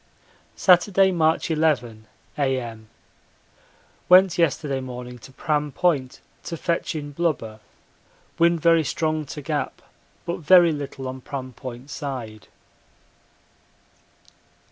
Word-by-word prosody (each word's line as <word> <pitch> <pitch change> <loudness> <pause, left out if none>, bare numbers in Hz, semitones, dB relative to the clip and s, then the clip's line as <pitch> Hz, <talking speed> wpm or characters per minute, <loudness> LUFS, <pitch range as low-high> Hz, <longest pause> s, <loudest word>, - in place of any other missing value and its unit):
Saturday, 190 +1 +4
March 165 -1 +1
11, 125 -9 0 0.3
A.M. 125 -6 -2 1.2
Went 185 0 +7
yesterday 145 -4 +1
morning 125 -1 -8
to 135 - -14
Pram 150 +1 -1
Point 140 -6 0 0.2
to 165 - -5
fetch 170 0 -2
in 145 -1 -5
blubber 140 -9 -2 0.8
wind 170 0 +4
very 165 0 +4
strong 155 0 -2
to 150 +1 -7
Gap 150 0 -3 0.5
but 170 +1 -2
very 175 0 +6
little 140 -3 -5
on 130 0 -6
Pram 130 -1 -6
Point 130 +3 -9
side. 125 -8 -6
145 Hz, 105 wpm, -23 LUFS, 130-165 Hz, 1.2 s, Went